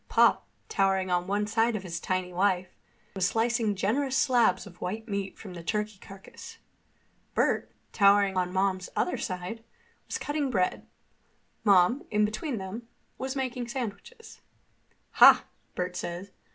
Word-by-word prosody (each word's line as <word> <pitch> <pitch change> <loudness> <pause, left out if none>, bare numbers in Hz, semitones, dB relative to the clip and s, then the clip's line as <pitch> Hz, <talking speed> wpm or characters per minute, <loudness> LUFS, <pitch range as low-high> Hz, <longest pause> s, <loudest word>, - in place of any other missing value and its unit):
Pop, - - +4 0.2
towering 190 -1 +1
on 180 0 +1
one 205 +1 0
side 225 +2 +1
of 200 - -4
his 170 -2 -5
tiny 185 0 -2
wife, 185 0 +1 0.4
was 190 -2 +1
slicing 225 -1 +1
generous 260 +8 0
slabs 240 -10 +3
of 175 - -14
white 220 +5 -4
meat 200 -2 -4
from 195 -4 -9
the 170 - -8
turkey 210 +1 -2
carcass. 195 0 -12 0.8
Bert, - - +1 0.2
towering 200 -1 +4
on 180 -1 0
Mom's 190 -1 0
other 360 - 0
side, 185 +3 -5 0.4
was - - -3
cutting 290 -2 -2
bread. 185 -7 0 0.8
Mom, 200 +4 +5
between 215 +6 0
them, 205 +5 -7 0.3
was 265 +1 -3
making 255 -2 -3
sandwiches. 245 - -7 0.8
"Ha!" - - +9 0.3
Bert 180 0 -3
said. 180 +3 -5
200 Hz, 140 wpm, -28 LUFS, 185-230 Hz, 0.8 s, Ha